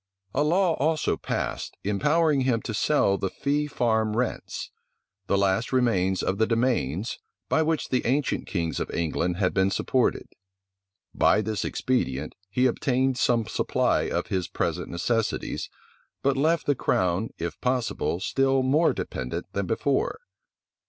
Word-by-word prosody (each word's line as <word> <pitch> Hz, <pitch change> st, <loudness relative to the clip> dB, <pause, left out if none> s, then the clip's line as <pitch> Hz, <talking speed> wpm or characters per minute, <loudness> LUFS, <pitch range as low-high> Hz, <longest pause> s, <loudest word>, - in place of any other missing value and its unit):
A 145 Hz, -, +2 dB
law 175 Hz, +3 st, +3 dB
also 155 Hz, +2 st, +1 dB
passed, -, -, -4 dB
empowering 145 Hz, -, +2 dB
him 125 Hz, -4 st, +1 dB
to 110 Hz, -, -4 dB
sell 105 Hz, -5 st, +2 dB
the 95 Hz, -, -1 dB
fee 145 Hz, +6 st, -1 dB
farm 110 Hz, -5 st, 0 dB
rents; 125 Hz, 0 st, -3 dB, 0.6 s
the 100 Hz, -, +2 dB
last 100 Hz, +3 st, +1 dB
remains 95 Hz, -8 st, +2 dB
of 95 Hz, +2 st, -1 dB
the 110 Hz, -, +3 dB
demesnes, 115 Hz, -, 0 dB, 0.3 s
by 160 Hz, -, +3 dB
which 160 Hz, -1 st, 0 dB
the 130 Hz, -, +1 dB
ancient 135 Hz, +3 st, 0 dB
kings 85 Hz, -4 st, -2 dB
of -, -, -3 dB
England 85 Hz, +1 st, -1 dB
had 95 Hz, -2 st, +1 dB
been 95 Hz, 0 st, +3 dB
supported. 125 Hz, +5 st, 0 dB, 0.9 s
By -, -, +4 dB
this 110 Hz, -1 st, -2 dB
expedient, 75 Hz, -, -1 dB, 0.2 s
he 125 Hz, +6 st, +1 dB
obtained 130 Hz, +1 st, +1 dB
some 120 Hz, -3 st, +2 dB
supply -, -, +1 dB
for -, -, -1 dB
his 95 Hz, -2 st, -1 dB
present -, -, -2 dB
necessities, 110 Hz, +5 st, -1 dB, 0.5 s
but 140 Hz, 0 st, +2 dB
left 155 Hz, +4 st, +2 dB
the 145 Hz, -, +3 dB
crown, 95 Hz, -4 st, 0 dB
if 85 Hz, 0 st, -5 dB
possible, 125 Hz, -8 st, 0 dB
still 135 Hz, +5 st, +2 dB
more 150 Hz, +6 st, +3 dB
dependent -, -, -5 dB
than -, -, -2 dB
before. -, -, 0 dB
120 Hz, 145 wpm, -26 LUFS, 95-135 Hz, 0.9 s, By